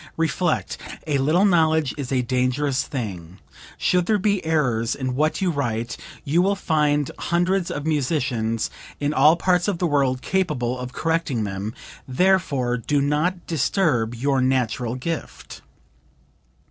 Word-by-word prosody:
Reflect, 165 Hz, +2 st, 0 dB, 0.3 s
'a 145 Hz, -3 st, 0 dB
little 160 Hz, +9 st, +3 dB
knowledge 160 Hz, -6 st, +3 dB
is 140 Hz, -3 st, -5 dB
a 130 Hz, -2 st, +1 dB
dangerous 130 Hz, +2 st, 0 dB
thing;' 95 Hz, -, -5 dB, 0.4 s
should 180 Hz, -1 st, +1 dB
there 215 Hz, -, +3 dB
be 200 Hz, -1 st, 0 dB
errors 125 Hz, -8 st, +1 dB
in 130 Hz, -2 st, -3 dB
what 155 Hz, +8 st, 0 dB
you 185 Hz, -2 st, +2 dB
write, 120 Hz, -6 st, -2 dB, 0.3 s
you 160 Hz, +5 st, +3 dB
will 200 Hz, +2 st, +2 dB
find 150 Hz, -6 st, +1 dB
hundreds 175 Hz, +1 st, +1 dB
of 145 Hz, -, -4 dB
musicians 130 Hz, -7 st, 0 dB, 0.3 s
in 145 Hz, +1 st, 0 dB
all 150 Hz, +3 st, +6 dB
parts 180 Hz, +1 st, +1 dB
of 200 Hz, -4 st, 0 dB
the 175 Hz, -, 0 dB
world 135 Hz, -5 st, +1 dB
capable 130 Hz, -10 st, -1 dB
of 125 Hz, 0 st, -5 dB
correcting 160 Hz, -6 st, -1 dB
them, 100 Hz, +2 st, -4 dB, 0.3 s
therefore 140 Hz, -5 st, +1 dB
do 145 Hz, +5 st, 0 dB
not 150 Hz, +6 st, 0 dB
disturb 140 Hz, -, +1 dB
your 135 Hz, +2 st, +1 dB
natural 125 Hz, -2 st, 0 dB
gift." 160 Hz, +5 st, -6 dB
145 Hz, 140 wpm, -23 LUFS, 125-165 Hz, 0.4 s, all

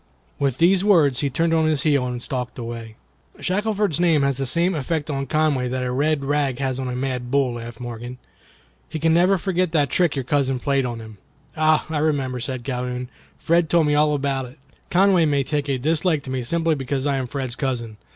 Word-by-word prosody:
With 135 Hz, -3 st, 0 dB
these 180 Hz, +3 st, +4 dB
words 160 Hz, -11 st, +4 dB
he 140 Hz, -, +1 dB
turned 165 Hz, +5 st, 0 dB
on 160 Hz, -1 st, +3 dB
his 150 Hz, -3 st, +1 dB
heel 140 Hz, -4 st, +2 dB
and 125 Hz, -1 st, -4 dB
stalked 125 Hz, -2 st, -4 dB
away. 115 Hz, -2 st, -7 dB, 0.4 s
"Shackelford's 205 Hz, -3 st, 0 dB
name 165 Hz, -5 st, +3 dB
has 140 Hz, -2 st, +1 dB
the 135 Hz, -1 st, -1 dB
same 170 Hz, +7 st, +2 dB
effect 155 Hz, 0 st, -2 dB
on 135 Hz, -1 st, -3 dB
Conway 150 Hz, -4 st, +1 dB
that 130 Hz, +1 st, -2 dB
a 125 Hz, -, -2 dB
red 145 Hz, +2 st, 0 dB
rag 140 Hz, -3 st, 0 dB
has 135 Hz, -1 st, -2 dB
on 130 Hz, -, -3 dB
a 125 Hz, -, -3 dB
mad 125 Hz, -1 st, -3 dB
bull," 135 Hz, -2 st, +1 dB
laughed 120 Hz, -1 st, -8 dB
Morgan. 120 Hz, +1 st, -7 dB, 0.7 s
"He -, -, -4 dB
can 160 Hz, +1 st, +2 dB
never 180 Hz, +3 st, +4 dB
forget 185 Hz, -2 st, -1 dB
that 145 Hz, -4 st, +2 dB
trick 175 Hz, -5 st, +2 dB
your 135 Hz, -3 st, -3 dB
cousin 135 Hz, -1 st, +1 dB
played 135 Hz, -1 st, +1 dB
on 120 Hz, -1 st, -5 dB
him." 110 Hz, -2 st, -11 dB, 0.4 s
"Ah! 155 Hz, 0 st, +3 dB
I 160 Hz, -2 st, -2 dB
remember," 140 Hz, -5 st, 0 dB
said 130 Hz, 0 st, -4 dB
Calhoun; 125 Hz, -1 st, -3 dB, 0.3 s
"Fred 170 Hz, -1 st, +2 dB
told 170 Hz, -1 st, +4 dB
me 150 Hz, -, +2 dB
all 150 Hz, 0 st, +3 dB
about 135 Hz, -2 st, -1 dB
it. 125 Hz, +4 st, -13 dB, 0.3 s
Conway 185 Hz, -2 st, +4 dB
may 145 Hz, -2 st, +2 dB
take 145 Hz, 0 st, -2 dB
a 135 Hz, -, +1 dB
dislike 155 Hz, +3 st, +1 dB
to 130 Hz, -, -6 dB
me 130 Hz, -1 st, -1 dB
simply 165 Hz, +5 st, +1 dB
because 135 Hz, -1 st, -2 dB
I 140 Hz, -1 st, +1 dB
am 130 Hz, -1 st, -2 dB
Fred's 130 Hz, -2 st, -3 dB
cousin. 120 Hz, -6 st, -3 dB
140 Hz, 215 wpm, -22 LUFS, 125-160 Hz, 0.7 s, these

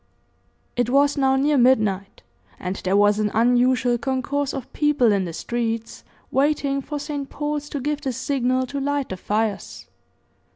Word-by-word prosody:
It 245 Hz, -1 st, 0 dB
was 280 Hz, +2 st, +3 dB
now 265 Hz, -2 st, +2 dB
near 285 Hz, +1 st, +2 dB
midnight, 215 Hz, -6 st, +2 dB, 0.4 s
and 180 Hz, +1 st, -3 dB
there 190 Hz, +2 st, 0 dB
was 205 Hz, +1 st, +4 dB
an 210 Hz, -1 st, +1 dB
unusual 245 Hz, +1 st, +3 dB
concourse 270 Hz, +2 st, -1 dB
of 265 Hz, -2 st, -7 dB
people 295 Hz, -6 st, +3 dB
in 195 Hz, -2 st, +1 dB
the 170 Hz, -, -5 dB
streets, 230 Hz, +3 st, -3 dB, 0.3 s
waiting 280 Hz, 0 st, +1 dB
for 295 Hz, +2 st, -5 dB
St. 290 Hz, -1 st, -5 dB
Paul's 295 Hz, 0 st, -3 dB
to 285 Hz, -, -4 dB
give 295 Hz, +2 st, -2 dB
the 270 Hz, -3 st, -2 dB
signal 255 Hz, 0 st, 0 dB
to 280 Hz, +2 st, -5 dB
light 285 Hz, -1 st, -1 dB
the 185 Hz, -, -5 dB
fires. 210 Hz, +2 st, -2 dB
260 Hz, 160 wpm, -23 LUFS, 225-285 Hz, 0.4 s, was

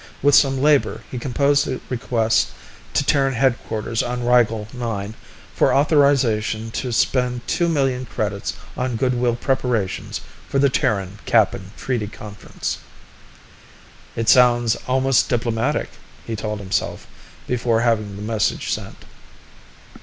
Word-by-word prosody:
With 145 Hz, 0 st, +5 dB
some 135 Hz, -1 st, +5 dB
labor, 145 Hz, 0 st, +2 dB
he 125 Hz, -, -4 dB
composed 140 Hz, +3 st, +2 dB
a 130 Hz, -, -3 dB
request 115 Hz, -3 st, +1 dB, 0.5 s
to 145 Hz, -, +3 dB
Terran 135 Hz, -1 st, +2 dB
headquarters 115 Hz, -3 st, 0 dB
on 125 Hz, 0 st, -3 dB
Rigel 115 Hz, -3 st, +3 dB
IX 110 Hz, -4 st, -4 dB, 0.4 s
for -, -, +3 dB
authorization 135 Hz, -7 st, +2 dB
to 125 Hz, +2 st, -3 dB
spend 125 Hz, +1 st, 0 dB
two 170 Hz, -1 st, +1 dB
million 135 Hz, -5 st, 0 dB
credits 105 Hz, -2 st, -3 dB, 0.2 s
on 125 Hz, -1 st, -2 dB
good 125 Hz, +2 st, +1 dB
will 120 Hz, -1 st, +1 dB
preparations 120 Hz, -6 st, -1 dB, 0.3 s
for -, -, -1 dB
the 140 Hz, 0 st, +4 dB
Terran 100 Hz, -6 st, -1 dB
Kappan 100 Hz, -4 st, +2 dB
treaty 120 Hz, -5 st, -2 dB
conference. 105 Hz, 0 st, -6 dB, 1.4 s
It 115 Hz, -1 st, +4 dB
almost 120 Hz, -2 st, +3 dB
sounds 130 Hz, 0 st, +3 dB
diplomatic, 120 Hz, +3 st, -1 dB, 0.4 s
he 115 Hz, -, -4 dB
told 105 Hz, 0 st, -3 dB
himself 95 Hz, -1 st, -2 dB, 0.4 s
before 115 Hz, 0 st, +1 dB
having 110 Hz, -4 st, 0 dB
the 100 Hz, -, -7 dB
message 110 Hz, -1 st, -1 dB
sent. -, -, -7 dB
120 Hz, 125 wpm, -21 LUFS, 110-130 Hz, 1.4 s, With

